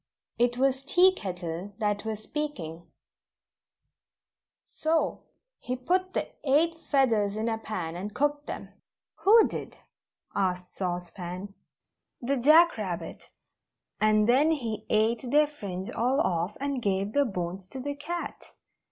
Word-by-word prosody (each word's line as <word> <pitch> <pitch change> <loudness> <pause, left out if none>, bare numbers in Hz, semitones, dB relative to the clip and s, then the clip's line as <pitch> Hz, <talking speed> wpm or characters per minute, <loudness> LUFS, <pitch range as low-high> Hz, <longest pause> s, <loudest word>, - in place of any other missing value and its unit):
It 245 0 +3
was 265 0 +2
Tea 360 +7 +5
Kettle 180 - -5
that 210 -2 -1
was 215 -1 -4
speaking: 170 - -5 1.8
"So, 320 +1 -1 0.3
he 250 - -3
put 365 +9 0
the - - 0 0.2
eight 305 +4 +3 0.2
feathers 225 -8 +3
in 220 +1 -1
a 225 -1 -1
pan, 180 -7 -4
and 195 +4 -5
cooked 290 +5 0
them - - -6 0.3
" - - -65
"Who 440 +3 +7
did?" - - -7 0.6
asked 180 -1 -1
Sauce 175 -2 -3
Pan. 185 +2 -7 0.7
"The 270 +3 0
Jack 310 +3 +6
Rabbit 175 -5 -5 0.7
and 215 0 +4
then 270 +6 +5
he 235 -9 -2
ate 225 +3 +1
their 300 +3 +5
fringe 200 -11 -6
all 255 +5 +1
off, 175 - 0
and 280 -2 -2
gave 200 0 0
the 285 - +4
bones 185 -4 -4
to 265 - -8
the 285 +2 -3
cat. 340 +4 -6
225 Hz, 135 wpm, -28 LUFS, 190-285 Hz, 1.8 s, Who